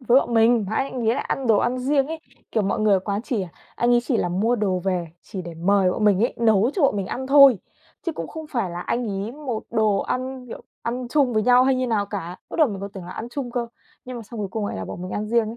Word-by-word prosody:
với 250 +1 +5
bọn 235 - -3
mình, 225 -1 +4
mà - - -1
anh 270 - +2
anh 240 -3 -1
ấy 230 - +3
lại - - -3
ăn 270 -2 -2
đồ 220 -2 +5
ăn 250 +4 0
riêng 275 +1 +1
ấy, 320 0 -5 0.3
kiểu, 220 - +2
mọi 195 +2 -1
người 215 -1 +3
ở 190 - +3
quán 200 +2 -3
chỉ, 235 -6 -2
à, 180 - -6 0.3
anh 240 0 +2
ấy 240 - +4
chỉ 245 -2 0
là 175 - 0
mua 215 +7 +1
đồ 195 -4 0
về 180 -3 -1
chỉ 190 -2 -7
để 170 -1 -8
mời 185 +2 +2
bọn 215 - -1
mình 200 -2 +4
ấy, 240 - +1
nấu 225 0 +3
cho 360 - 0
bọn 270 - +3
mình 195 -2 -2
ăn 260 +1 -4
thôi, 275 -5 +7 0.5
chứ 335 - 0
cũng - - -6
không 315 -1 -8
phải 235 - -2
là 175 - -5
anh 235 +6 -2
ấy 200 +3 -3
một 265 -7 -4
đồ 215 -2 +2
ăn, 255 0 -3
kiểu, - - -9 0.2
ăn 245 +1 -3
chung 270 -2 +2
với 215 -1 +2
nhau 250 +2 +5
hay 265 0 +3
như 255 0 0
nào 210 -4 0
cả. 185 -4 -5
Bắt - - -8
đầu 310 -5 +5
mình 195 -2 -5
còn 200 0 -5
tưởng 190 -3 -8
là 180 - -9
ăn 230 - -6
chung 260 -2 -4
cơ, 240 -1 -2 0.4
nhưng 255 -1 -7
mà 235 - -6
xong 220 0 -8
cuối 200 - -3
cùng 210 0 -2
lại - - -4
là 95 - -4
bọn 95 - -7
mình 185 - -6
ăn 210 +1 -3
riêng 230 -1 +2
ấy. 230 - -7
225 Hz, 305 wpm, -23 LUFS, 200-250 Hz, 0.5 s, thôi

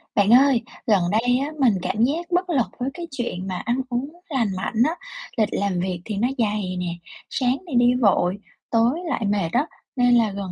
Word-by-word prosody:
Bạn 200 0 +3
ơi, 260 -1 +6 0.3
gần 205 -5 +4
đây 245 +4 +2
á, 275 - -1
mình 255 -5 +5
cảm 215 +5 0
giác 330 +8 0
bất 360 +1 +1
lực 270 -8 +2
với 250 +2 -1
cái 345 -1 -7
chuyện 235 -8 -4
mà 185 -1 -3
ăn 240 +3 +1
uống 250 +3 -2 0.2
lành 260 -7 +1
mạnh 195 +5 -4
á. 325 - -1 0.4
Lịch 215 -2 +2
làm 200 -3 -1
việc 180 -1 -2
thì 215 - -4
nó 230 +5 +2
dày 210 -5 -1
nè, 180 -1 -2 0.4
sáng 255 0 +1
thì 290 - -4
đi 245 +1 +5
vội, 195 -3 +3 0.3
tối 235 +7 +3
lại 235 -6 -1
mệt 200 -4 0
á, 265 +5 +2 0.3
nên 245 -1 +4
là 225 -3 +3
gần 195 -2 -5
235 Hz, 210 wpm, -23 LUFS, 200-260 Hz, 0.4 s, ơi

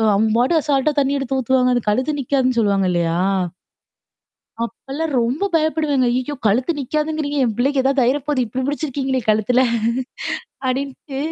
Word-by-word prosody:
அவங்க 220 +2 +2
பாட்டு 255 +8 +2
அசால்ட்டா 290 0 +1
தண்ணீ 280 0 +1
எடுத்து 270 0 -2
ஊத்துவாங்க. 255 0 +2
அந்த 245 - 0
கழுத்து 260 +8 0
நிக்காதுன்னு 255 -2 +1
சொல்லுவாங்க 200 -3 +2
இல்லையா? 170 -1 0 1.5
அப்பல்லாம் 275 +7 -5
ரொம்ப 260 +12 0
பயப்படுவேன்ங்க. 310 -5 +2
அய்யோ! 255 +4 -2
கழுத்து 245 +9 +2
நிக்காதுங்கிறீங்க? 300 +1 -2
என் 225 -3 0
பிள்ளைக்கு 270 +2 +1
ஏதாவது 270 0 +3
ஆயிற 260 +4 +2
போகுது 285 -4 +1
இப்டி 250 +4 -4
முடிச்சிருக்கீங்களே 275 -3 -1
கழுத்துல. 215 +4 +3 1.0
அப்படின்ட்டு 270 +1 -3
265 Hz, 140 wpm, -20 LUFS, 245-290 Hz, 1.5 s, ஏதாவது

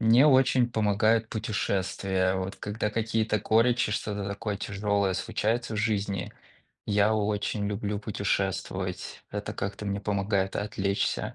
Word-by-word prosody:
Мне 115 +5 +6
очень 130 -3 +5
помогают 110 0 +2
путешествия, 95 -3 0
вот 95 +1 -3
когда 105 +1 -2
какие-то 110 0 0
горечи, 115 +1 +3
что-то 105 -2 -2
такое 100 +1 -3
тяжелое 100 -1 0
случается 115 +4 -1
в - - -3
жизни. 100 -4 -1 0.5
Я 105 +1 +3
очень 105 -1 -1
люблю 105 0 -2
путешествовать, 100 -2 -2
это - - -4
как-то 100 +1 -4
мне 100 0 -1
помогает 100 -1 0
отвлечься, 100 -1 -1
105 Hz, 120 wpm, -28 LUFS, 100-110 Hz, 0.5 s, Мне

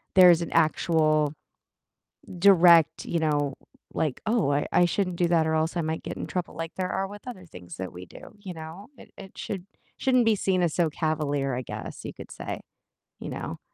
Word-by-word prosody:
there's 175 -2 +8
an 170 - -4
actual 155 -2 +2 1.1
direct, 175 -5 +6
you 170 - -1
know, 145 -3 0 0.4
like, 150 -5 -1
"Oh, 215 -10 +2
I 145 +1 0
I 175 - +5
shouldn't 180 0 -1
do 175 - +2
that 165 -2 +3
or 160 - 0
else 160 +2 0
I - - +1
might 160 0 -3
get - - -6
in - - -5
trouble," 180 -1 -4
like 165 0 -6
there 185 -1 -2
are 190 0 -1
with 205 +4 -12
other 185 -8 -8
things 90 - -11
that 95 0 -5
we 90 +1 -9
do, 210 - -13
you 190 -3 -7
know? 165 - -9
It - - -15
it 190 - -12
should 190 -3 -5 0.3
shouldn't 255 -3 +3
be 220 -1 +4
seen 185 -2 +1
as 165 - +1
so 170 -3 +2
cavalier, 145 -4 -1
I 130 - -2
guess - - -7
you - - -5
could - - -11
say, - - -6 0.6
you - - -6
know? - - -6
165 Hz, 205 wpm, -26 LUFS, 155-185 Hz, 1.1 s, there's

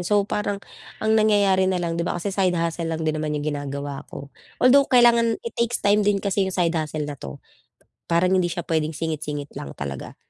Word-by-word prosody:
'yan, 175 - -5
so 205 -1 +3
parang 205 -1 -2 0.4
ang 220 0 +1
nangyayari 200 -3 +3
na 185 - 0
lang 170 -1 -2
di 170 - -1
ba 175 - -2
kasi 195 +3 -3
side 185 -3 +2
hustle 165 0 -2
lang 160 0 -3
din 155 - +1
naman 150 -1 -2
yung 145 +1 -4
ginagawa 140 -1 -4
ko. 140 - -9 0.3
Although 275 +2 +5
kailangan 235 -2 +5
it 465 - -5
takes 235 +1 0
time 205 +1 +3
din 205 -1 +2
kasi 195 -1 0
yung 190 - -5
side 170 -1 +1
hustle 155 -1 -2
na 145 - -5
'to. 70 - -9 0.7
Parang 180 +2 +3
hindi 180 -2 +2
siya 175 0 -4
puwedeng 160 -1 -1
singit-singit 150 -3 -4
lang 70 - -7
talaga. 70 -2 -6
175 Hz, 215 wpm, -23 LUFS, 155-205 Hz, 0.7 s, Although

